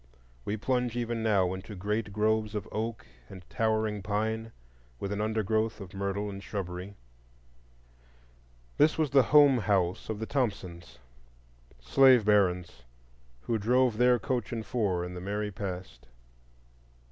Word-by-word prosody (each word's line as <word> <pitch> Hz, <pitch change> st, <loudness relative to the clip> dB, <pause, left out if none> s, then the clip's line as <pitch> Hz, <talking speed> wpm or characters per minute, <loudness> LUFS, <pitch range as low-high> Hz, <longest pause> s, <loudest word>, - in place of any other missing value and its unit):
We 105 Hz, -, -2 dB
plunge 125 Hz, +1 st, -1 dB
even 120 Hz, -1 st, -2 dB
now 100 Hz, -5 st, +2 dB
into 95 Hz, +3 st, -8 dB
great 105 Hz, +2 st, -2 dB
groves 110 Hz, +1 st, 0 dB
of 105 Hz, -, -4 dB
oak 110 Hz, +1 st, -4 dB, 0.2 s
and 95 Hz, -3 st, -12 dB
towering 110 Hz, -2 st, 0 dB
pine, 110 Hz, +3 st, -2 dB, 0.5 s
with 100 Hz, -, -4 dB
an 105 Hz, 0 st, -2 dB
undergrowth 110 Hz, 0 st, 0 dB
of 95 Hz, -1 st, -10 dB
myrtle 100 Hz, +1 st, -2 dB
and 100 Hz, -1 st, -7 dB
shrubbery. 95 Hz, 0 st, -5 dB, 1.8 s
This 150 Hz, +2 st, +4 dB
was 155 Hz, -3 st, 0 dB
the 140 Hz, -1 st, +6 dB
"home 145 Hz, -2 st, +5 dB
house" 100 Hz, -3 st, 0 dB
of 110 Hz, -, -2 dB
the 110 Hz, -, -4 dB
Thompsons,—slave 65 Hz, -, 0 dB
barons 90 Hz, -, +2 dB, 0.6 s
who 115 Hz, -, -1 dB
drove 120 Hz, +1 st, +2 dB
their 125 Hz, 0 st, +5 dB
coach 120 Hz, +1 st, -2 dB
and 115 Hz, -2 st, -4 dB
four 95 Hz, -8 st, -1 dB
in 90 Hz, -, -7 dB
the 90 Hz, -, -7 dB
merry 105 Hz, +2 st, -3 dB
past. 90 Hz, -11 st, -7 dB
105 Hz, 135 wpm, -29 LUFS, 95-115 Hz, 1.8 s, the